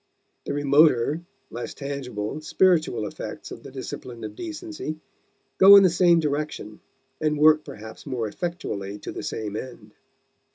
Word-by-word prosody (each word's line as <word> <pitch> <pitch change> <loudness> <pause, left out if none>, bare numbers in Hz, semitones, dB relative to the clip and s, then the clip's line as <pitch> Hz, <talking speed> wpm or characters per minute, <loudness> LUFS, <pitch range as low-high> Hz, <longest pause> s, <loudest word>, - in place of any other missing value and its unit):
The - - -3
remoter, 145 0 +3 0.3
less 120 - -6
tangible, 140 -3 -5
spiritual 160 - +2
effects - - -7
of - - -8
the - - -10
discipline 120 -2 -8
of 110 - -6
decency 320 - -6 0.6
go 195 +1 +10
in 200 - +9
the 185 - +5
same 170 -1 +4
direction 145 -8 -3 0.4
and 150 -1 +1
work 155 +1 +5
perhaps 110 -2 -10
more 125 -5 -2
effectually 105 - -5
to - - -7
the - - -6
same 105 -2 -4
end. 110 -3 -8
145 Hz, 140 wpm, -25 LUFS, 110-165 Hz, 0.6 s, go